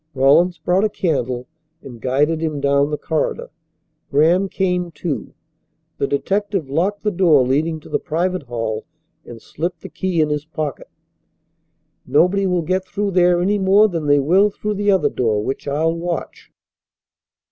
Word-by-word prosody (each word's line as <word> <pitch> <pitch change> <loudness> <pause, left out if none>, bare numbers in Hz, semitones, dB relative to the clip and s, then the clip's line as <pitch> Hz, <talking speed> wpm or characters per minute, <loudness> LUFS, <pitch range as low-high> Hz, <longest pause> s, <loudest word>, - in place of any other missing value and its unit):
Rawlins 155 +7 +4
brought 180 +6 +1
a 215 - +2
candle 130 - -2 0.4
and 120 -4 -11
guided 145 +6 +1
him 155 -3 -2
down 140 +1 +2
the 150 - -2
corridor. 475 - -2 0.6
Graham 170 +7 +3
came, 180 -2 -1
too. 160 -2 -5 0.6
The 140 - +1
detective 195 +1 -1
locked 190 +7 0
the 210 - +1
door 170 -8 +4
leading 155 +5 0
to - - -14
the - - -1
private 180 +3 -1
hall 115 -2 -4 0.4
and 120 -1 -10
slipped 170 +9 -5
the 190 - -9
key 175 +1 -2
in 155 -1 +2
his 150 -1 -2
pocket. 155 -3 -5 1.2
"Nobody 180 +9 +3
will 180 -2 0
get 185 +3 0
through 200 +1 -3
there 175 -1 +3
any 205 +2 +1
more 200 +3 +5
than 165 -6 -3
they 145 0 +5
will 185 +9 +3
through 210 +1 -4
the 205 0 -1
other 190 -2 +3
door 110 -4 0
which 135 +4 -4
I'll 155 +4 +1
watch." 170 0 -5
165 Hz, 160 wpm, -20 LUFS, 140-185 Hz, 1.2 s, more